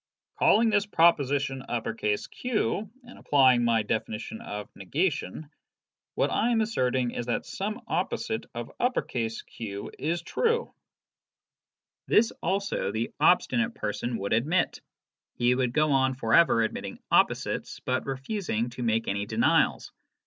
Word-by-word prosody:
Calling 225 0 +5
this 205 -1 +2
proposi 155 -7 +4
tion 120 -6 -3
Q, 220 -4 -1
and 245 0 -14
applying 130 -4 +4
my 115 -2 +2
definition 110 +1 -3
of 105 0 -6
negation, 150 - -2 0.6
what - - +1
I 235 - +2
am 235 -2 +2
asserting 130 - 0
is 120 - -5
that 120 - -1
some 210 +2 -4
opposite - - -2
of - - -5 0.7
Q 100 -3 -7
is 165 +3 -1
true." 470 - 0 1.3
This 225 +1 +4
also 195 - -1
the 110 +2 -2
obstinate 235 +9 +3
person 115 - -3
would 100 0 -2
admit. 150 +11 +1 0.5
He 120 +1 +3
would 125 -1 0
go 155 +3 +2
on 130 -1 +2
for 115 -3 -2
ever 160 -9 +5
admitting 110 - -4
opposites, - - +1
but 130 +1 -2
refusing 135 - -2
to 125 - -8
make 115 -1 0
any 100 +1 -2
denials. - - +2
130 Hz, 130 wpm, -27 LUFS, 115-190 Hz, 1.3 s, Calling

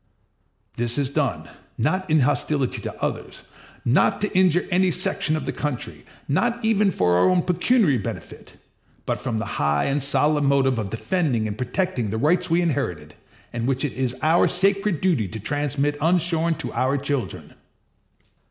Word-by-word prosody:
This 120 +1 0
is 140 -2 0
done, - - -1 0.3
not 185 +10 -1
in 155 -1 +4
hostility 140 0 0
to - - -7
others, - - -4 0.4
not 120 +5 +3
to 210 - -2
injure 180 -2 +3
any 185 +1 +3
section 170 -2 -1
of - - -5
the - - -2
country, 145 -4 -5 0.2
not 235 - 0
even 210 -2 +3
for 90 - +2
our 90 - +4
own 180 -2 +2
pecuniary 180 - +2
benefit, 100 - -8 0.5
but - - -2
from 120 -3 -3
the 110 - -2 0.2
high 75 0 +2
and 140 +1 0
solemn 145 +2 +1
motive 135 -3 +2
of 105 -3 -3
defending 125 - -1
and 105 - -4
protecting 125 - -2
the 110 - -2
rights 170 +9 +1
we 170 +2 +3
inherited, 90 - -2 0.4
and 120 0 -2
which 135 +2 0
it 145 - -3
is 130 -1 -2
our 160 +2 +4
sacred 195 -2 +1
duty 160 - +1
to 110 +4 -7
transmit 145 +4 -1
unshorn 170 0 +2
to - - -6
our 130 +2 +1
children. 140 -2 -4
145 Hz, 165 wpm, -23 LUFS, 125-180 Hz, 0.5 s, in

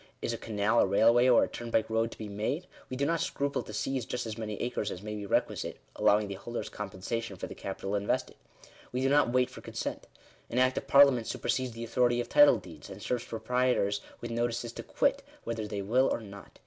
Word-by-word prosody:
Is 115 - -2
a - - -3
canal, 105 +1 +1
a - - +6
railway, 115 +5 +5
or 120 - +6
a - - 0
turnpike 115 -2 -1
road 115 0 +1
to - - -12
be 110 - -6
made? 110 - -2 0.2
we 130 - -4
do 140 - +1
not 165 0 +1
scruple 140 0 -1
to - - -10
seize 135 -2 -2
just 125 +2 -4
as 110 -1 -4
many 105 -2 -5
acres 120 -4 -2
as 90 - -7
may 105 0 -5
be 105 -1 -5
requisite; - - 0 0.2
'allowing 105 0 +3
the 100 - -4
holders 120 +5 -5
compensation 105 +2 -4
for - - -5
the - - -8
capital 95 0 -5
invested. 100 0 -1 0.6
We 125 - -1
do 135 - +2
not 145 -3 +4
wait 125 0 +2
for - - -10
consent. - - -5 0.4
An 120 - -3
Act 130 0 +4
of - - -14
Parliament 135 -4 +6
supersedes 130 -2 -1
the 115 +1 -6
authority 120 +1 +2
of 120 0 -3
title 145 -4 +7
deeds, 90 -6 -11
and 95 - -9
serves 120 +4 -2
proprietors 115 -3 0 0.2
with 120 - -5
notices 120 0 -1
to - - -6
quit, - - +1 0.2
whether 115 -2 -3
they 100 -2 -4
will 125 +6 +3
or - - 0
not. 100 -2 -12
115 Hz, 225 wpm, -30 LUFS, 105-125 Hz, 0.6 s, title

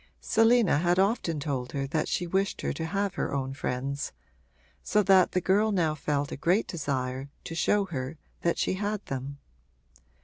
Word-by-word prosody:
Selina 225 -8 +4
had 175 +2 +2
often 190 -5 +1
told 135 -4 -3
her 140 -1 -1
that 155 +3 -1
she 175 - -1
wished 190 +3 0
her - - -1
to 160 - -4
have 200 +1 -1
her - - -2
own 135 -1 -2
friends, 140 +1 -3 0.7
so 210 0 +2
that 190 -2 +5
the 180 - +2
girl 205 +4 +3
now 170 -6 +2
felt 145 -1 -1
a - - -3
great 180 +9 +2
desire 135 -5 -3
to - - -6
show 200 +5 +2
her 145 -3 -5 0.2
that 170 - +1
she - - +1
had 205 +2 -2
them. 135 +1 -5
165 Hz, 175 wpm, -28 LUFS, 140-195 Hz, 0.7 s, that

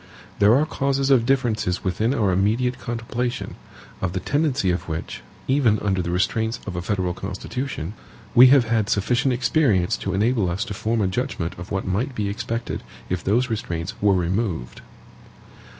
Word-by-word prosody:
There 105 +3 +6
are 145 +3 +3
causes 140 -2 0
of 120 -3 +4
differences 115 -9 +1
within 105 +6 0
our 105 -7 +2
immediate 115 +7 +1
contemplation, 120 0 -3 0.5
of 90 -2 -1
the 95 - -1
tendency 140 - +1
of 90 0 -3
which, 80 0 -5 0.3
even 130 -6 +3
under 95 -3 0
the 85 - -3
restraints 110 +6 0
of 95 - -5
a 90 - -2
federal 90 -2 -1
constitution, 95 - -5 0.4
we 125 +2 +9
have 135 0 +6
had 110 -2 +1
sufficient 120 +6 +1
experience 120 - +2
to 95 -1 -3
enable 110 -1 +2
us 95 +7 -2
to 105 - -5
form 110 +3 -1
a 95 - +2
judgment 95 -5 -2
of 90 - -8
what 95 -1 -2
might 115 +8 -1
be 105 -3 -1
expected 115 +3 -3 0.3
if 90 -2 -2
those 120 +5 +1
restraints 90 -3 -3
were 100 -1 +4
removed. 90 - -2
110 Hz, 165 wpm, -23 LUFS, 95-125 Hz, 0.5 s, we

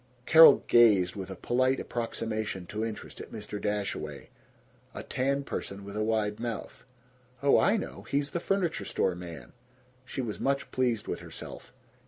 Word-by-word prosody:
Carol 160 0 +8
gazed 105 -7 +5
with 95 -2 -6
a 95 - -6
polite 130 +5 +1
approximation 110 -5 -3
to 105 +5 -4
interest 115 -1 -6
at - - -10
Mr. 105 -1 -6
Dashaway, 105 -1 -3 0.7
a - - -5
tan 140 +2 -1
person 100 -6 -5
with 100 0 -8
a 110 - 0
wide 105 -1 0
mouth. 120 0 -5 0.6
"Oh, 140 - +5
I 215 - +3
know! - - -6
He's 140 0 0
the 170 - -1
furniture 185 -2 0
store 95 - 0
man!" 85 -2 -9 0.5
She 130 - -7
was 115 -5 -3
much 140 0 -1
pleased 125 -4 0
with - - -3
herself. - - -10
115 Hz, 160 wpm, -29 LUFS, 105-135 Hz, 0.7 s, Carol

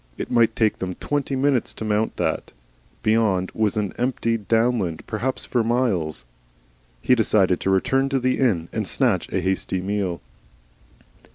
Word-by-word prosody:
It - - -5
might 115 -2 +3
take 110 -2 +1
them 90 -1 -4
twenty 145 -2 -2
minutes 135 -2 +1
to 110 - -5
mount 110 +1 0
that. - - -2 0.5
Beyond 110 -4 +2
was 110 -2 0
empty 115 +3 -1
downland 115 -5 0
perhaps 125 +5 -3
for 120 -2 0
miles. 110 - 0 0.8
He - - +4
decided 100 -6 +3
to - - -1
return 135 +8 +2
to 135 -1 +1
the 130 0 0
inn 95 -11 +1
and - - -2
snatch - - 0
a - - 0
hasty 95 0 -1
meal. 95 -2 -2
110 Hz, 150 wpm, -23 LUFS, 95-125 Hz, 0.8 s, He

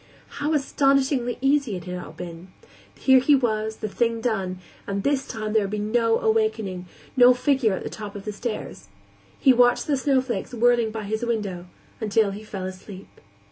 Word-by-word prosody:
How 295 +2 0
astonishingly 275 -3 +1
easy 275 -5 +2
it 180 - -6
had 180 0 -6
all - - -10
been; 170 0 -9 0.5
here 265 -1 +5
he 285 +3 +4
was, 220 -4 0
the 215 - -4
thing 230 +3 0
done; 195 -6 -2 0.3
and 200 0 -2
this 280 -1 0
time 215 -2 -4
there 220 - +4
would 200 - -2
be 210 - -3
no 225 +2 +1
awakening, 225 - 0 0.3
no 250 -1 +7
figure 255 -4 +2
at - - -4
the - - -5
top 210 -2 -8
of 200 - -8
the 210 - -4
stairs. 205 - -6 0.5
He 265 - +6
watched 245 0 +4
the 295 - +1
snowflakes 260 -5 -1
whirling 240 -1 +3
by 220 0 -5
his 220 +3 -3
window 205 -7 -3 0.3
until 215 -1 +2
he 205 +2 -8
fell 195 -3 -6
asleep. 185 +1 -9
220 Hz, 180 wpm, -24 LUFS, 200-255 Hz, 0.5 s, no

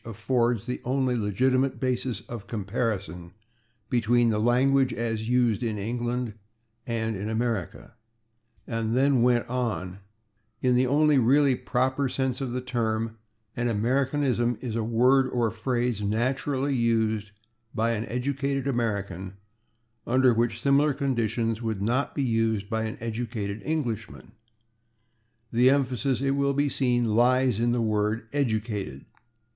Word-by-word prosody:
affords 115 0 0
the 125 - -4
only 130 0 0
legitimate 130 +5 +1
basis 125 -4 -1
of 115 -4 -9
comparison 100 -5 -3 0.6
between 120 0 +2
the 105 -1 0
language 130 +3 +3
as 115 -1 -3
used 120 -3 +2
in 110 -3 -2
England 120 +2 -2 0.5
and 115 -2 -1
in 100 +3 -4
America," 110 -5 -3 0.7
and 115 0 -1
then 135 -2 +3
went 120 -1 +3
on: 115 -7 -3 0.6
In 125 0 +2
the 125 +1 +3
only 150 +1 +4
really 135 +3 +4
proper 130 +2 0
sense 130 0 -2
of 130 -3 -3
the 125 +1 -2
term, 115 -3 -2 0.4
an 120 0 -1
Americanism 125 +1 +1
is 120 -4 -4
a 115 - 0
word 125 +4 +3
or 120 -3 0
phrase 120 -1 -1
naturally 130 +6 0
used 110 -3 +1 0.5
by 115 +1 +1
an 115 -1 -2
educated 135 +2 -2
American 100 -7 -2 0.7
which - - -31
under 120 -2 +4
similar 140 +6 +2
conditions 115 -4 -1
would 110 -3 -2
not 120 +6 0
be 140 - 0
used 115 -4 0
by 110 0 0
an 110 - -5
educated 110 -2 -4
Englishman. 120 -9 -4 1.2
The 125 +2 +5
emphasis, 130 -1 +1
it 135 0 +1
will 140 0 +1
be 145 +1 +2
seen, 125 -3 +1
lies 125 +1 +3
in 120 +1 +2
the 120 0 +1
word 110 +1 0
"educated." 110 - -2
120 Hz, 135 wpm, -26 LUFS, 110-130 Hz, 1.2 s, The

